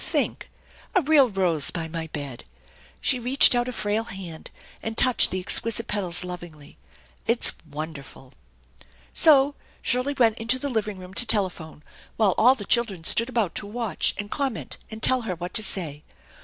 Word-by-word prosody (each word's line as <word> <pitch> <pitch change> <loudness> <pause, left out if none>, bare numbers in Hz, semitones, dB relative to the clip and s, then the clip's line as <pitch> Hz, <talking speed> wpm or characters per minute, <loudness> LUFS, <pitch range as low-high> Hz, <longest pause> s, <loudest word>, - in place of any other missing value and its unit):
Think. - - -3 0.5
A - - +5
1 330 - -6
real 285 -4 +4
rose 180 -7 0
by 165 -2 -4
my 160 0 -6
bed! 145 -5 -8 0.3
" - - -29
She 255 - +1
reached 255 +3 +7
out 240 0 -1
a - - -4
frail 215 -1 -3
hand, 180 -7 -9 0.3
and 225 0 -6
touched 255 -1 +4
the 185 - -4
exquisite 230 +5 +2
petals 185 -5 +1
lovingly. 175 - -11 0.2
" - - -30
It 230 +1 0
is - - +4 0.2
wonderful! 145 -3 -10 0.4
" 65 - -25 0.3
So 285 -3 +4 0.3
Shirley 255 +3 -1
went 230 -3 +2
into 230 +3 0
the 280 +2 -4
living 215 -5 -3
room 185 0 -12
to 240 - +3
telephone, 180 -8 0 0.3
while 210 -4 +2
all 255 +3 +5
the 205 -6 -8
children 210 -8 -1
stood 230 +8 +2
about 230 -8 -2
to 205 - -3
watch 220 -4 -2
and 205 0 -7
comment 275 -5 -4
and 220 0 -11
tell 255 -1 +7
her 220 -6 -5
what 175 +2 -8
to 220 - +2
say. 160 -8 -1
205 Hz, 185 wpm, -23 LUFS, 170-240 Hz, 0.5 s, reached